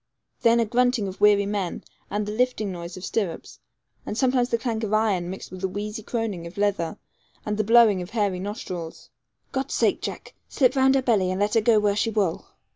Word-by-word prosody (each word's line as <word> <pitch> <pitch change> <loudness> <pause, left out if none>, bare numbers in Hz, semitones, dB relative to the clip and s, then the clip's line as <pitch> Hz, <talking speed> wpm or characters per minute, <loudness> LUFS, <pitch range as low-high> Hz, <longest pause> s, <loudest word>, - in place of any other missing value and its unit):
Then 235 0 +4
a 230 - +3
grunting 245 -1 +1
of 190 +1 -8
weary 205 -1 +5
men, 200 -3 -3 0.3
and 210 0 -2
the 210 - -4
lifting 220 -3 0
noise 170 0 -7
of 185 - -7
stirrups, 195 -7 -3 0.4
and 210 - -5
sometimes 250 -1 +2
the 235 - +1
clank 225 -1 -3
of 215 0 0
iron 200 -5 +1
mixed 190 - -8
with 185 0 -8
the 190 - 0
wheezy 210 +3 -5
croning 215 -7 -3
of 170 - -13
leather 200 -5 0 0.5
and 210 - -1
the 215 - 0
blowing 220 -3 +5
of 180 - -7
hairy 205 -5 0
nostrils. 185 -4 -6 0.4
'God's 270 0 -2
sake, - - +2
Jack, - - -6 0.2
slip 260 -1 +2
round 265 0 +4
her 265 - +2
belly, 210 -7 +2
and 185 +1 -2
let 205 +1 +1
her 225 - +4
go 220 0 +4
where 205 -1 +1
she 215 - +1
wull.' 200 -6 -1
210 Hz, 210 wpm, -24 LUFS, 190-230 Hz, 0.5 s, weary